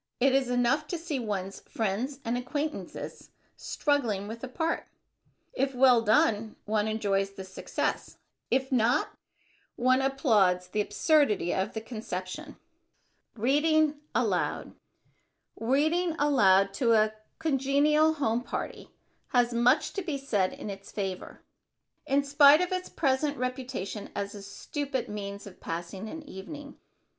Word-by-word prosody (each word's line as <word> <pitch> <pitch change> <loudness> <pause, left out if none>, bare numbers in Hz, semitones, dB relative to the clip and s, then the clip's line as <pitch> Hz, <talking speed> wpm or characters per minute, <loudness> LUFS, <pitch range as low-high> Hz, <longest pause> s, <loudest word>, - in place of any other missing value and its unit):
It 265 +1 +4
is 265 -2 +2
enough 250 +5 +1
to 350 - -3
see 325 -4 -3
one's 195 -4 -4
friends 235 +6 -2
and 230 +1 0
acquaintances 290 +5 -5 0.3
struggling 235 -10 -1
with 230 +3 -8
a - - -3
part. 320 +6 -2 0.7
If 270 - -1
well 250 -2 +6
done, 215 0 +2
one 210 0 0
enjoys 200 -3 0
the 195 -1 -8
success; 190 0 -3 0.3
if 265 +2 +1
not, 245 -1 +2 0.7
one 255 +2 +3
applauds 215 - +2
the 210 - 0
absurdity 285 - +2
of 190 +2 -1
the 220 - -3
conception. 215 -5 -6 0.8
[Sidenote: 220 - -10
READING 300 +2 +3
ALOUD] - - 0 0.8
Reading 315 +8 +1
aloud 195 -9 +4
to 230 +2 +2
a 215 -1 +3 0.2
congenial 300 +1 +3
home 245 -6 0
party - - -5 0.4
has 245 -1 +2
much 245 +5 +3
to 395 - -2
be 320 -6 -3
said 210 -9 0
in 205 - -6
its 195 0 -10
favor, 190 -3 -5 0.6
in 280 +1 +2
spite 285 +2 +7
of 360 +1 -1
its 370 0 -2
present 285 0 0
reputation 250 -5 -4
as 200 0 -3
a 205 - -8
stupid 265 +6 -4
means 200 -1 -6
of 195 -3 -12
passing 175 +5 -5
an 320 +4 -7
evening. 285 +9 -9
245 Hz, 135 wpm, -28 LUFS, 205-285 Hz, 0.8 s, spite